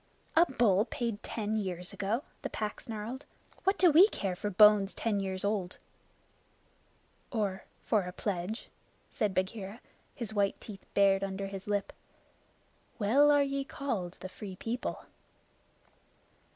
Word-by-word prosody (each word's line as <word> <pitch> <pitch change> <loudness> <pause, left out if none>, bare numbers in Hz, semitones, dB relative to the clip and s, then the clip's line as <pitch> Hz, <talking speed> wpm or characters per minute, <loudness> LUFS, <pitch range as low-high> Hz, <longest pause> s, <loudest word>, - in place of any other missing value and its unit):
"A 335 +2 +6
bull 215 -5 +3
paid 235 -4 -3
ten 215 -1 -3
years 180 -3 -4
ago!" 215 +7 -1 0.2
the - - -3
Pack 215 -1 -4
snarled. 225 +4 -6 0.4
"What 385 +1 +3
do 360 -3 +6
we 345 +7 +8
care 195 - -3
for 205 +3 -3
bones 205 0 +6
ten 215 -3 0
years 190 0 -1
old?" 200 -3 -1 1.5
"Or 200 -5 -2 0.2
for 215 -3 +2
a 180 - -5
pledge?" 190 +3 -3 0.4
said 210 -5 -1
Bagheera, 195 +2 -2 0.4
his 235 -6 -4
white 200 -2 +1
teeth 200 -3 -10
bared 195 -1 +4
under 195 0 -3
his 195 0 -7
lip. 205 -1 -1 1.0
"Well 255 +7 +5
are 290 -1 +5
ye 275 0 -1
called 225 -11 -4
the - - -5
Free 190 0 -8
People!" 230 +6 -4
210 Hz, 140 wpm, -31 LUFS, 195-235 Hz, 1.5 s, we